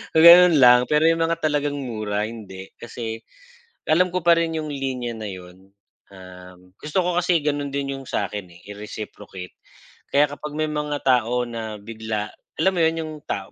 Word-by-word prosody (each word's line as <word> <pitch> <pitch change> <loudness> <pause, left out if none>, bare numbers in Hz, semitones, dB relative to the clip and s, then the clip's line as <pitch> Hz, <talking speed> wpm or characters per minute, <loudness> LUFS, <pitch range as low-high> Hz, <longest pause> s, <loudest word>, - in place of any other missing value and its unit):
gano'n 170 +1 +9
lang. 125 0 +8
Pero 150 0 +2
'yong 165 - -1
mga 165 +1 0
talagang 145 -1 0
mura 110 -6 -3
hindi 100 -4 -8
kasi 115 -1 -6 0.7
alam 180 +3 +3
ko 180 - 0
pa 170 -1 +7
rin 165 -1 -1
'yong 155 - -5
linya 130 -4 -4
na 110 -1 -6
yun, 95 +1 -13 0.4
um, 90 -1 -13 0.2
gusto 150 - -2
ko 180 0 -1
kasi 180 -1 +2
gano'n 145 -1 -2
din 140 -1 -3
'yong 135 - -9
sa 100 - -1
akin 95 -2 -7 0.2
i-reciprocate 105 -2 -9 0.6
kaya 145 +1 +4
kapag 145 +1 -7
may 155 - +1
mga 150 -1 -2
tao 125 -1 +2
na 110 -2 -6
bigla, 110 0 -5 0.3
alam 190 - +4
mo - - +1
yun 160 0 +2
yung 155 0 -7
tao 95 -1 -4
125 Hz, 175 wpm, -22 LUFS, 105-150 Hz, 0.7 s, gano'n